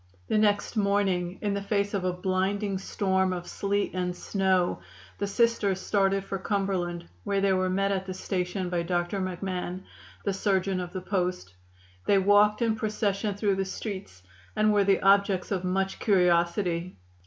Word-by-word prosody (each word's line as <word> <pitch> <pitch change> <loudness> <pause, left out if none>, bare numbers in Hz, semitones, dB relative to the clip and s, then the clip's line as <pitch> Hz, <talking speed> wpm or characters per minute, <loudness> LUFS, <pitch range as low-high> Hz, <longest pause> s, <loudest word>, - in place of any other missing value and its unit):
The - - +2
next 205 +1 +1
morning, 195 -3 +1
in 205 -1 0
the 200 - -2
face 200 0 -1
of 195 -2 -1
a 180 - +2
blinding 190 +2 -1
storm 190 -1 0
of 175 -1 -4
sleet 200 +2 -1
and 180 -1 -2
snow, 190 -2 +1 0.4
the 200 - -1
Sisters 205 -3 +1
started 195 -1 +1
for 195 0 -4
Cumberland, 190 -4 -2 0.2
where 200 - 0
they 195 -1 +3
were 185 0 +1
met 195 +2 +1
at 190 -1 -2
the 185 - -3
station 185 0 -2
by 175 -1 0
Dr. 175 +2 -1
McMahon, 185 0 -4 0.4
the 200 - +1
surgeon 195 -1 0
of 175 -1 -5
the 185 - -5
post. 180 - -2 0.5
They 200 - +5
walked 205 +3 +4
in 225 -1 +2
procession 210 -1 -1
through 205 -1 +1
the 195 - 0
streets, 190 - -6 0.3
and 215 0 +3
were 205 -1 +4
the 195 -1 +3
objects 195 -1 +3
of 190 -2 -1
much 190 +1 -1
curiosity. 175 - +1
195 Hz, 165 wpm, -27 LUFS, 185-200 Hz, 0.5 s, They